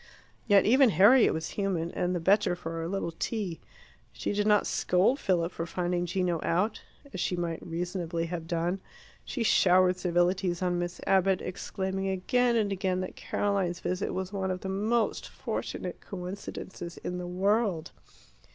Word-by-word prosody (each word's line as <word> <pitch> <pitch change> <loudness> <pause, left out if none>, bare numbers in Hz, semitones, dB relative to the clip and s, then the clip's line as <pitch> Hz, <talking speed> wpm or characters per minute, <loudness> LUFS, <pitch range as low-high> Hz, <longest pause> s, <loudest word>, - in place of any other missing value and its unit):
Yet 200 -2 +5
even 260 +3 +6
Harriet 220 +6 +6
was 160 - -3
human, 180 -5 -1
and 180 -1 -1
the - - 0
better 190 +2 +3
for 165 -1 -5
a 165 - -3
little 185 -2 -2
tea. 185 0 -3 0.5
She - - -3
did 205 +1 0
not 210 -1 +4
scold 195 +10 +2
Philip 175 -5 +1
for 165 0 -4
finding 175 0 -1
Gino 175 -1 0
out, 185 +7 0 0.3
as - - -5
she 180 - 0
might 170 -2 -3
reasonably 170 0 -3
have 165 -1 -5
done. 170 +3 -1 0.4
She 245 - -3
showered 185 -3 +4
civilities 180 0 +1
on 175 -1 +1
Miss 175 0 -4
Abbott, 190 -1 +3
exclaiming 190 +1 -3
again 235 +6 +1
and 210 -3 +1
again 190 -1 0
that 185 - -6
Caroline's 195 -4 -1
visit 185 +2 -2
was 190 +1 -4
one 190 -1 -1
of 185 -1 -3
the 190 - -4
most 220 +4 0
fortunate - - -5
coincidences 180 -2 -7
in 180 0 -3
the 180 - -5
world. 190 -1 0
185 Hz, 160 wpm, -29 LUFS, 175-200 Hz, 0.5 s, even